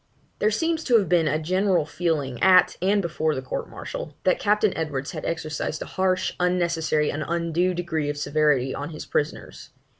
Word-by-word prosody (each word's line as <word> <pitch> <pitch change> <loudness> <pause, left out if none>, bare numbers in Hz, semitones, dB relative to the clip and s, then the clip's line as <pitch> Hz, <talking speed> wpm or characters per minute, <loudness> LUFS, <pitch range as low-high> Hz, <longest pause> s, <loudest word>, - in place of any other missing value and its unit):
There 210 - +3
seems 325 +8 0
to 240 -3 +5
have 205 - +1
been 170 -3 +3
a 155 +1 +1
general 185 +1 +1
feeling 150 -7 -2
at 185 -1 +6
and 200 +2 +2
before 160 -2 -1
the 130 - -3
court 130 - -4
martial, 145 - -7
that 185 - +2
Captain 210 -1 +2
Edwards 145 -4 -3
had - - -6
exercised 155 -1 -3
a - - -12
harsh, 185 -1 +1
unnecessary, 170 -4 +1
and 150 +1 -3
undue 170 +2 0
degree 160 -4 -2
of 145 - -3
severity 145 -3 +1
on 145 +2 -5
his 155 -2 -8
prisoners. 150 +1 -3
165 Hz, 180 wpm, -24 LUFS, 150-185 Hz, -, at